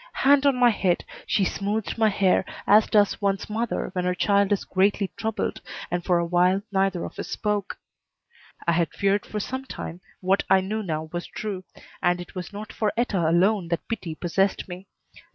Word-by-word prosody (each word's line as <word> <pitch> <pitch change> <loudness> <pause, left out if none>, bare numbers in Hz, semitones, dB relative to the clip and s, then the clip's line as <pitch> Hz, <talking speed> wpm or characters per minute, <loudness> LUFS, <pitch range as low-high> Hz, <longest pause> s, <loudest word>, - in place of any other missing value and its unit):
Hand 285 +1 +4
on 275 - +4
my 245 -1 +5
head, 185 -4 0 0.2
she 195 - +2
smoothed 205 +3 -2
my 220 -1 +3
hair 195 -2 +3 0.2
as 210 +2 +6
does 205 -1 +3
one's 195 -1 0
mother 225 -1 -2
when 180 -2 -1
her 180 0 0
child 200 +1 +2
is 205 - +1
greatly 195 +1 +1
troubled, 220 -2 -2 0.3
and 175 0 -1
for 175 -1 +2
a 170 - +1
while 180 +3 +2
neither 190 -2 +1
of - - -9
us - - -4
spoke. 210 -2 -2 0.9
I 170 - +3
had 170 0 +2
feared 200 +1 +1
for 215 - -3
some 260 +6 -4
time 175 -8 -7 0.2
what 190 +1 +2
I 190 - +6
knew 210 +4 -2
now 160 -5 -3
was 175 0 -4
true, 195 -4 -5 0.4
and 175 0 +2
it 175 - -9
was 180 0 -6
not 210 +1 -8
for 215 -2 0
Etta 195 -9 +1
alone 185 +2 +3
that 170 0 -3
pity 190 -8 -4
possessed 190 +4 0
me. 185 +1 -9
195 Hz, 190 wpm, -25 LUFS, 180-210 Hz, 0.9 s, as